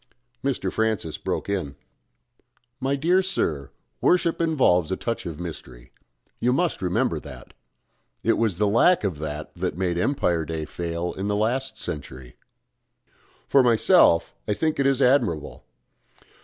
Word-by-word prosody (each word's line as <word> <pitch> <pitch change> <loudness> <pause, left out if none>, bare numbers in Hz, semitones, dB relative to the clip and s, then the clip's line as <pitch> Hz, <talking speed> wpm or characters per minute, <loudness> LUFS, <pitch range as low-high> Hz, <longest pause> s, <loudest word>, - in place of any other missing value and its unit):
Mr. 125 -9 -1
Francis 110 -9 -1
broke - - -3
in. 90 -9 -3 1.0
"My 135 +1 0
dear 175 +7 +3
sir, 80 - -2 0.3
worship 170 -2 +2
involves 125 - +2
a - - +1
touch 115 -5 -3
of 80 -2 -6
mystery. 65 -8 -9 0.5
You 125 - +2
must 170 - 0
remember 90 -1 0
that. - - -12 0.7
It - - +3
was 110 -6 0
the 105 - +2
lack 115 - +4
of 90 -7 -2
that 75 0 -5
that - - -3
made 90 -2 -1
Empire 90 - +1
Day 80 0 -4
fail 85 +2 -4
in 95 +1 -4
the 105 - 0
last 115 +3 -1
century. 65 - -7 1.1
For 140 - +5
myself, 120 - +4
I 105 - 0
think 155 +3 -1
it 135 - +3
is 135 0 +2
admirable. 120 - +1
100 Hz, 140 wpm, -24 LUFS, 85-135 Hz, 1.1 s, For